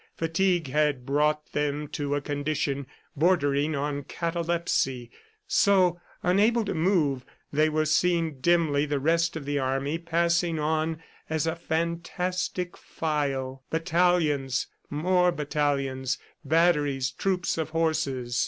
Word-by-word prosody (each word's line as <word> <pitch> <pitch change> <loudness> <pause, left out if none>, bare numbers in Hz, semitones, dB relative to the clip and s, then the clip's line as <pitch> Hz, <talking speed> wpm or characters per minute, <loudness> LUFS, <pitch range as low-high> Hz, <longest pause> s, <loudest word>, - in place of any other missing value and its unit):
Fatigue 170 0 +1
had 145 -3 +1
brought 150 +2 +1
them 150 0 -1
to 145 0 -2
a 145 - -1
condition 145 -1 -2 0.3
bordering 150 -2 +2
on 145 0 -2
catalepsy 165 -6 -1 0.3
so, 195 - +3 0.2
unable 215 +5 +3
to 200 - -2
move, 155 -7 +1 0.3
they 155 +2 +3
were 155 0 +1
seeing 165 -2 +1
dimly 155 -2 +2
the 145 -1 0
rest 165 +4 +1
of 155 -3 -5
the 145 0 -1
army 135 +4 -1
passing 170 0 +1
on 155 +1 0 0.3
as 160 0 0
a 160 0 0
fantastic 170 +2 -2
file 135 -4 -3
battalions, 165 -6 +1 0.2
more 180 +4 +2
battalions, 140 -4 -1 0.3
batteries, 145 -4 +2
troops 185 -3 -1
of 160 - -2
horses. 135 -7 -1
155 Hz, 115 wpm, -27 LUFS, 140-170 Hz, 0.3 s, so